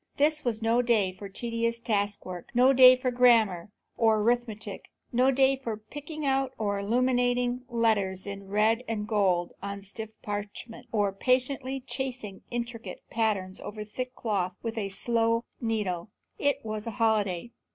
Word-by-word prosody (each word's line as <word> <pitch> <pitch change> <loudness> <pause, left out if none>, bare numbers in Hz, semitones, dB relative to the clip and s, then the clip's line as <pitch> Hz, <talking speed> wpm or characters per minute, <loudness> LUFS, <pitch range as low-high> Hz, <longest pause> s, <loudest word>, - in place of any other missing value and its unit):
This 305 +1 +2
was 230 -2 -1
no 230 +2 +3
day 225 -6 +2
for 200 +1 -9
tedious 230 +2 -2
task 205 -3 -1
work, 180 -2 -7
no 255 +2 +6
day 255 -1 +9
for 255 0 -1
grammar 225 -7 +4 0.3
or 225 -1 +4
arithmetic, 220 -3 -1 0.3
no 250 +2 +4
day 270 0 +4
for 235 -5 -5
picking 290 +7 -7
out 270 -1 +1
illuminated 245 +4 +1
letters 215 -6 +1
in 200 -1 -7
red 215 +4 +2
and 210 -2 -3
gold 190 -5 +1
on 200 0 -5
stiff 215 +3 -5
parchment, 210 +4 -6
or 205 -3 +1
patiently 260 +4 0
chasing 250 -6 -4
intricate 235 -1 -5
patterns 205 -5 0
over 210 0 -6
thick 255 +4 -5
cloth 195 -5 -1
with 230 -1 -2
the 210 -3 -3
slow 230 +3 +1 0.2
needle. 210 -6 -2 0.3
It 285 -2 0
was 215 0 -4
a - - -2
holiday. 220 -3 +1
225 Hz, 150 wpm, -28 LUFS, 205-250 Hz, 0.3 s, day